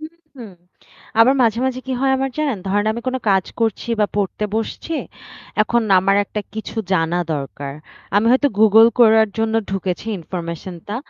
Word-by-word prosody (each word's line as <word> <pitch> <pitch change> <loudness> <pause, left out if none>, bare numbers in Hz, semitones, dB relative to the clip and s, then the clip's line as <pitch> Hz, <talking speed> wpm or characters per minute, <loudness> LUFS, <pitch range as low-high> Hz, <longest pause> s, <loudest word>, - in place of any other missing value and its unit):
হু, 310 - -6 0.3
হু। 245 - -8 0.8
আবার 260 +4 +6
মাঝে, 230 -1 +2
মাঝে 255 -1 -2
কি 260 - -3
হয় 270 0 +2
আমার 270 0 -1
জানেন? 285 -8 0
ধরেন 205 +2 +1
আমি 235 - -5
কোন 260 - -1
কাজ 190 -2 +3 0.2
করছি 225 0 -1
বা 210 - +4
পড়তে 205 +1 -1
বসছি। 225 +8 -4 0.7
এখন 235 +2 +1 0.2
আমার 195 +2 +2
একটা 210 - -5
কিছু 220 +1 -7 0.2
জানা 165 0 +1 0.2
দরকার। 140 0 -6 0.4
আমি 210 +2 +3
হয়তো 275 +3 +3
Google 220 +1 +7
করার 220 -2 +6
জন্য 225 0 0 0.2
ঢুকেছি 190 +1 -3
ইনফরমেশন 170 +1 -6
টা। 210 - -3
220 Hz, 170 wpm, -19 LUFS, 190-235 Hz, 0.8 s, Google